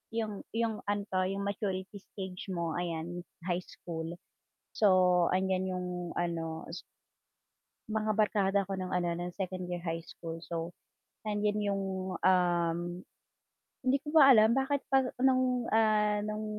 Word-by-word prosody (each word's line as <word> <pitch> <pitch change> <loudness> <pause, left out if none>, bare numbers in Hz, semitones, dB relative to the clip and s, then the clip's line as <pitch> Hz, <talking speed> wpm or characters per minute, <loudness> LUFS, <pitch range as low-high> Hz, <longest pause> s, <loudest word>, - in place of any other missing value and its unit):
Yung 215 -3 -2 0.2
yung 225 -2 0
ano 205 0 0
'to, 185 0 +2
yung 195 +1 -2
maturity 200 -1 -3
stage 190 -1 -8
mo 170 -3 -2
ayan 175 0 -3 0.2
high 175 0 0
school, 165 -2 -7 0.6
so 185 -4 +4
andiyan 190 0 +1
yung 180 0 -3 0.3
ano 165 -2 -2
s 175 - -6 1.1
Mga 215 0 0
barkada 205 -2 +2
ko 195 - -2
ng 185 -1 -4
ano 175 -1 +1
ng 175 0 -4
2nd 185 -2 -4
year 175 -1 -4
high 165 -1 -3
school, 165 -1 -7
so 165 0 -3 0.5
nandiyan 210 -1 0
yung, 195 0 -1 0.4
um 175 -2 +3 1.1
hindi 260 +2 +4
ko 295 - -5
pa 275 -3 +10
alam 220 0 +6
bakit 270 +1 +1
pa 270 - +7 0.2
nung, 255 -2 +3
ah, 210 -1 +3
nung 215 0 -3
190 Hz, 140 wpm, -31 LUFS, 175-215 Hz, 1.1 s, pa